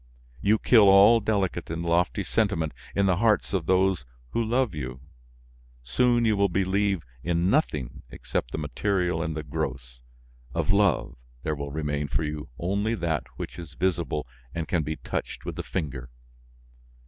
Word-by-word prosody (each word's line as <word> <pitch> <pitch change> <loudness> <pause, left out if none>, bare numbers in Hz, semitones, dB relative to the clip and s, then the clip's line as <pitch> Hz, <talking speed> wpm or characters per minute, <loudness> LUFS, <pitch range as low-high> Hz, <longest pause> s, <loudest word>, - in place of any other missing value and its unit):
You 105 +2 +4
kill 110 -3 +6
all 100 +4 +8
delicate 100 -5 -1
and 85 +1 -3
lofty 85 +1 +1
sentiment 95 -8 0 0.2
in 100 - +3
the 90 -3 +3
hearts 110 -1 +2
of 90 -5 -1
those 95 -4 +3 0.3
who 115 - +1
love 120 -1 +1
you; 65 -4 -5 0.8
soon 120 - +2
you 110 -1 +3
will 100 0 +3
believe 95 -1 +1 0.2
in 85 +2 +1
nothing 75 - 0
except - - -3
the - - -4
material 90 +4 0
and 80 -2 -3
the 75 - -3
gross; 65 -5 -4 0.6
of - - +1
love, 100 -13 +2 0.3
there 80 - 0
will 70 -1 -4
remain 75 -1 -2
for 70 - -1
you 75 -2 -4
only 100 +6 0
that 85 - -1
which - - -7
is 80 -4 -9
visible 85 -4 -1 0.3
and 80 -2 -2
can 90 - +1
be 80 +1 -3
touched - - -5
with - - -4
the - - -3
finger. 70 -8 -4
85 Hz, 160 wpm, -26 LUFS, 75-100 Hz, 0.8 s, all